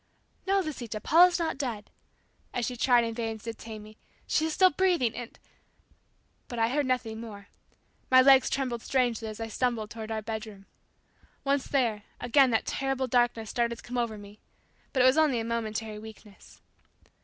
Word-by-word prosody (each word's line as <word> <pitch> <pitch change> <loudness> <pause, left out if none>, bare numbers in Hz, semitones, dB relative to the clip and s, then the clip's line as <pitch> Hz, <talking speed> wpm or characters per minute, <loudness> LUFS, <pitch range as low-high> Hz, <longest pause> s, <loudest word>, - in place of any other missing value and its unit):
"No, 390 0 +3
Lisita; 245 - -5
Paula's 350 - +5
not 330 -5 -2
dead," 235 -7 -4 0.6
as 240 - 0
she 250 - -3
tried 245 0 +4
in 230 0 -3
vain 225 -1 -3
to 215 - -19
detain 220 -1 -9
me; 215 +1 -14 0.3
"She 315 - +1
is 320 - -3
still 370 +2 +5
breathing 340 -10 +1
and" 240 -2 -8 1.1
but 240 - -7
I 225 0 +2
heard 285 +1 0
nothing 230 -3 -2
more. 205 -3 -10 0.6
My 255 - +7
legs 265 0 +6
trembled 250 -4 -2
strangely 240 -4 0
as 215 0 -7
I 225 - -3
stumbled 225 -2 -2
toward 220 -1 -7
our 220 -1 -3
bedroom. 215 -2 -6 0.8
Once 275 -1 0
there, 235 -7 0 0.2
again 260 +2 +4
that 225 -2 +1
terrible 270 -1 -1
darkness 240 -3 +1
started 235 -1 0
to - - -15
come 245 0 -3
over 230 -3 -2
me, 205 +1 -13 0.5
but 260 -2 +2
it - - +5
was 260 +4 +5
only 290 -6 +3
a - - -2
momentary 220 -2 -3
weakness. 215 -2 -14
235 Hz, 180 wpm, -28 LUFS, 220-265 Hz, 1.1 s, My